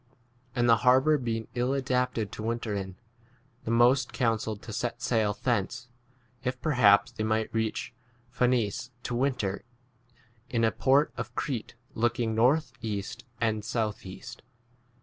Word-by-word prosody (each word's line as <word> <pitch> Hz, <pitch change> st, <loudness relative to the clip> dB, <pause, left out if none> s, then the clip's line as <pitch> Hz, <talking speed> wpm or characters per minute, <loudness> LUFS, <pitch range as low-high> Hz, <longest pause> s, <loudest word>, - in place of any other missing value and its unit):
And 120 Hz, -1 st, +2 dB
the 115 Hz, -1 st, +6 dB
harbour 130 Hz, +5 st, +4 dB
being 115 Hz, -3 st, -3 dB
ill 125 Hz, +2 st, 0 dB
adapted 125 Hz, -5 st, 0 dB
to -, -, -7 dB
winter 115 Hz, -1 st, -2 dB
in, 95 Hz, -2 st, -4 dB, 0.7 s
the -, -, -3 dB
most 120 Hz, +2 st, +4 dB
counselled 110 Hz, -3 st, -1 dB
to 110 Hz, -, -7 dB
set 120 Hz, +1 st, -2 dB
sail 110 Hz, -3 st, +1 dB
thence, 120 Hz, 0 st, -1 dB, 0.5 s
if 125 Hz, -1 st, -2 dB
perhaps 125 Hz, -6 st, +4 dB
they 110 Hz, -2 st, -4 dB
might 110 Hz, 0 st, 0 dB
reach 110 Hz, +1 st, -2 dB, 0.4 s
Phcenice 125 Hz, -2 st, +1 dB
to -, -, -3 dB
winter 120 Hz, -6 st, -1 dB, 0.9 s
in, 115 Hz, -2 st, 0 dB
a 110 Hz, -, +4 dB
port 140 Hz, +3 st, +3 dB
of -, -, -5 dB
Crete 125 Hz, -7 st, -3 dB, 0.2 s
look 120 Hz, +1 st, 0 dB
ing 115 Hz, -2 st, 0 dB
north 125 Hz, +7 st, +3 dB
east 110 Hz, +2 st, -4 dB
and 110 Hz, -2 st, 0 dB
south 110 Hz, -1 st, -2 dB
east. 95 Hz, 0 st, -9 dB
115 Hz, 145 wpm, -28 LUFS, 110-125 Hz, 0.9 s, the